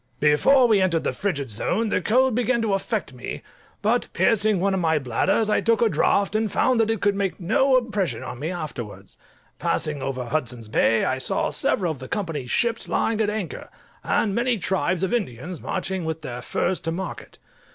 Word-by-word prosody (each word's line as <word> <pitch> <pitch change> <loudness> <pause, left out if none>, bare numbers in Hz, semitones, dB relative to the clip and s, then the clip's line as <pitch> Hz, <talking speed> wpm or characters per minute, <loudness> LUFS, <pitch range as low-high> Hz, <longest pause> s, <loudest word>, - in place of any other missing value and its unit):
Before 155 - +5
we 215 -4 +4
entered 170 -4 +1
the - - -1
frigid 140 - -2
zone 205 - 0
the - - +1
cold 255 +6 +3
began 245 +1 +1
to 210 -3 +1
affect 195 - -2
me; 125 - -7 0.4
but 230 +4 +2
piercing 215 -3 +3
one 195 +2 +1
of 190 - 0
my 160 -2 +2
bladders, 135 - +1
I 210 - +2
took 230 0 +2
a 230 - +3
draught, 200 0 +1
and 215 -1 +1
found 255 -2 +2
that 225 -1 +2
it 225 -4 -1
could 205 0 +3
make 195 -2 -2
no 255 +9 +3
impression 200 - -1
on 125 -1 -7
me 155 +4 -3
afterwards. 155 - -7 0.4
Passing 150 -2 -1
over 130 -2 -3
Hudson's 120 -4 -3
Bay, 115 +1 +3
I 130 - 0
saw - - -1
several 190 - +1
of 150 - -7
the 130 - -8
Company's 160 -10 -3
ships 230 -1 0
lying 225 -1 0
at 210 - +1
anchor, 210 -5 -5 0.3
and 205 -3 +1
many 240 +2 +1
tribes 185 -1 0
of 190 - 0
Indians 175 - -3
marching 190 -1 -3
with 160 -1 -4
their 125 -3 -5
furs 180 +8 -1
to 165 - -3
market. 185 +3 -6
190 Hz, 195 wpm, -24 LUFS, 150-220 Hz, 0.4 s, Before